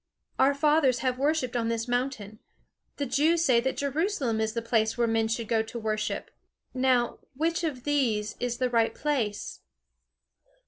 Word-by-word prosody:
Our 280 +1 +4
fathers 280 -3 +3
have 255 0 0
worshipped 280 -4 0
on 230 -1 0
this 230 0 -2
mountain. 245 -4 -2 0.6
The 285 - -1
Jews 325 +6 +2
say 250 -3 +5
that 265 +2 -2
Jerusalem 280 - 0
is 220 0 -1
the 230 - -2
place 225 0 +1
where 240 - +3
men 225 -1 +1
should 225 0 -2
go 225 0 +2
to 225 +2 -7
worship. 215 -1 -3 0.4
Now, 255 -2 +1 0.2
which 330 +4 0
of 275 -7 -3
these 225 -8 0
is 245 -1 -2
the 255 -1 0
right 230 -1 +2
place?" 245 -9 -2
245 Hz, 165 wpm, -27 LUFS, 225-280 Hz, 0.6 s, say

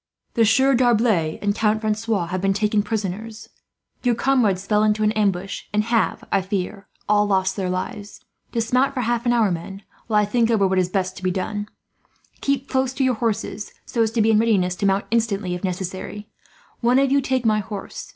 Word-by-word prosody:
"The 230 - +3
Sieur 265 +5 +4
D'Arblay 225 -10 +2
and 205 0 +2
Count 215 0 +1
Francois 215 -3 0
have 180 +2 -3
been 195 0 +2
taken 210 +1 +1
prisoners. 215 +1 -4 0.5
Your 245 -2 +2
comrades 220 -8 +1
fell 210 0 +2
into 215 0 +2
an 215 - +3
ambush, 195 -3 -1
and 210 0 +1
have, 230 0 0
I 195 - +3
fear, 195 +1 -4 0.2
all 210 0 +3
lost 190 -1 +1
their 190 -3 -2
lives. 205 +3 -5 0.3
Dismount 250 +4 +1
for 255 - 0
half 240 +1 -1
an - - +4
hour, 225 -5 +3
men, 195 +4 -6 0.2
while 215 -2 +3
I - - +1
think 230 +2 +1
over 210 -4 +3
what 190 0 +1
is 180 -1 +1
best 185 -1 -2
to 185 - -10
be 185 - +2
done. 205 +3 -3 0.7
Keep 275 -1 -1
close 260 -1 0
to 270 - -1
your 260 -1 +3
horses, 220 -3 -3
so 235 - -1
as 225 - +3
to 230 - +2
be 225 - +4
in 215 - +4
readiness 200 -6 +2
to 200 - +1
mount 195 +1 +1
instantly, 210 -5 0
if 180 - -5
necessary. 190 +3 -4 0.5
One 245 +1 +3
of 275 0 +3
you 280 0 +4
take 260 -2 -1
my 215 -1 +3
horse. 205 -1 -7
210 Hz, 205 wpm, -22 LUFS, 195-230 Hz, 0.7 s, Sieur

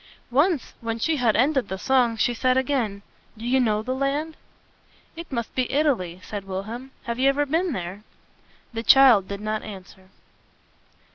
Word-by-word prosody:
Once, 295 +2 +1
when 230 -1 -3
she 315 +7 0
had 235 -5 +2
ended 265 -1 +2
the 190 - -4
song, 245 0 +2
she 240 - +1
said 255 +2 +1
again, 245 -7 -1 0.3
"Do 225 - -8
you 260 +2 +2
know 215 -3 +1
the 255 - -2
land?" 285 +4 -2 0.8
"It 335 -1 -9
must 235 -3 -3
be 255 -1 -1
Italy," 245 - 0
said 205 -2 -6
Wilhelm. 220 +7 -5
"Have 235 +1 -4
you 270 +1 +4
ever 290 +1 +1
been 330 +5 0
there?" 185 -3 -5 0.7
The 225 - -3
child 235 -6 +6
did 200 0 -6
not 215 0 -2
answer. 190 -2 -11
240 Hz, 165 wpm, -24 LUFS, 210-275 Hz, 0.8 s, child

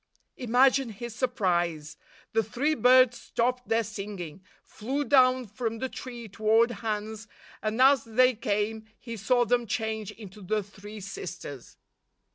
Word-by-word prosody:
Imagine 255 +1 +3
his 235 +2 -7
surprise! 175 - -1 0.4
The 225 - +3
three 255 +8 -1
birds 255 -3 +5
stopped 250 +1 -1
their 225 0 +2
singing, 195 -6 -7 0.2
flew 265 +7 -3
down 255 -2 +4
from 225 +2 -4
the 260 +3 -3
tree 240 -3 -8
toward 220 +3 +2
Hans, 220 0 -4 0.3
and 215 +2 -2
as 270 -1 +6
they 250 +3 +4
came, 215 0 -2
he 230 -2 -8
saw 240 +4 +2
them 240 0 +1
change 220 -1 -2
into 210 -2 -11
the 210 +3 -1
three 205 +1 -11
sisters. 175 -8 -8
225 Hz, 135 wpm, -27 LUFS, 210-250 Hz, 0.4 s, as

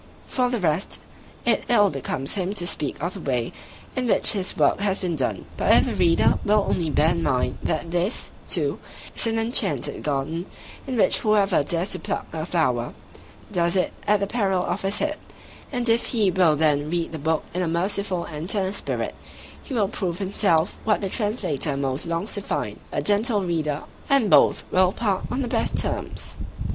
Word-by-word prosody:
For 250 -1 0
the 245 -2 -1
rest, 165 0 0 0.5
it - - +2
ill 205 -4 +5
becomes 135 -1 -3
him 190 0 -1
to 175 - 0
speak 150 -5 -1
of 175 +2 -1
the 195 - -7
way 125 -7 -2 0.4
in 255 -1 -1
which - - +5
his 195 -3 -2
work - - +3
has 200 -1 0
been 175 -3 -2
done: 120 -9 -2
but - - +2
if - - +5
the - - -2
reader 170 -1 +3
will 210 -1 +3
only 165 -3 0
bear 155 +2 +3
in 170 -1 -1
mind 125 -4 0
that 165 +1 -2
this, 175 +6 -1 0.2
too, - - +1 0.4
is - - +2
an 225 0 0
enchanted 225 - +2
garden, 150 +5 -2 0.4
in 260 -2 -2
which - - +4
whoever 205 -6 +3
dares 170 +6 -1
to 185 - 0
pluck - - -3
a 160 0 -4
flower, 125 -9 0 0.6
does 170 +1 +1
it 185 - +1
at 210 0 +4
the 200 - 0
peril 195 -4 0
of - - -2
his 195 +2 -1
head; 305 0 -1 0.5
and 245 -2 0
if 230 +1 +3
he 215 -6 +2
will 175 -4 +4
then 150 -1 +1
read 170 0 -1
the 160 - -6
book 160 +2 0
in 180 - -1
a 180 - 0
merciful 180 +2 -1
and 155 +2 -6
tender 195 -2 0
spirit, - - -3 0.5
he 270 - -6
will 210 -4 +2
prove 185 -4 -3
himself 190 -4 +2
what 215 -1 +1
the 195 - -2
Translator 165 - -1
most 140 +3 -1
longs 170 +5 -2
to 205 - -1
find, - - -3
"a - - -2
gentle 210 0 +2
reader", 155 -4 -1 0.3
and 275 -8 +3
both - - +5
will 185 0 +4
part 200 -3 -1
on 265 +2 -1
the - - -3
best 235 -2 0
terms. - - -3
185 Hz, 195 wpm, -24 LUFS, 160-205 Hz, 0.6 s, ill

